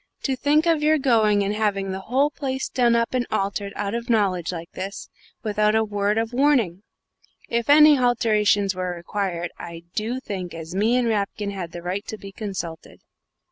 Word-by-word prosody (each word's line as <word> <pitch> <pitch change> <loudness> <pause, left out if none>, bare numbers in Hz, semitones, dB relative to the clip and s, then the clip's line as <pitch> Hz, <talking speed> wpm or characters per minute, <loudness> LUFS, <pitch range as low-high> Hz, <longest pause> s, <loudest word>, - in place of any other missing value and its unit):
To 270 - 0
think 300 +4 +2
of 330 -3 +2
your 310 +1 +4
going 220 -7 +3
and 200 +1 -1
having 200 -3 -1
the 190 - -4
whole 265 +9 +1
place 265 -2 -3
done 240 -2 +3
up 230 +1 0
and 250 -2 0
altered 200 -1 -2
out 200 +1 -3
of 235 +1 -4
knowledge 190 -7 +1
like 170 -1 -7
this, 195 +2 -7 0.3
without 210 0 +1
a 220 - +3
word 205 0 0
of 225 +1 -1
warning! 245 - +2 0.7
If 235 +2 -1
any 300 0 +8
halterations 215 -5 +2
were 180 -1 -3
required, 175 -1 -3
I 170 -1 -8
do 230 +4 -2
think 185 -8 -6
as 165 +1 -7
me 215 +5 +2
and 250 -1 +2
Rapkin 205 -1 -1
had 185 -4 -6
the 170 0 -8
right 185 +3 -3
to 220 - -5
be 195 -1 -10
consulted." 190 -6 -6
210 Hz, 185 wpm, -23 LUFS, 195-245 Hz, 0.7 s, any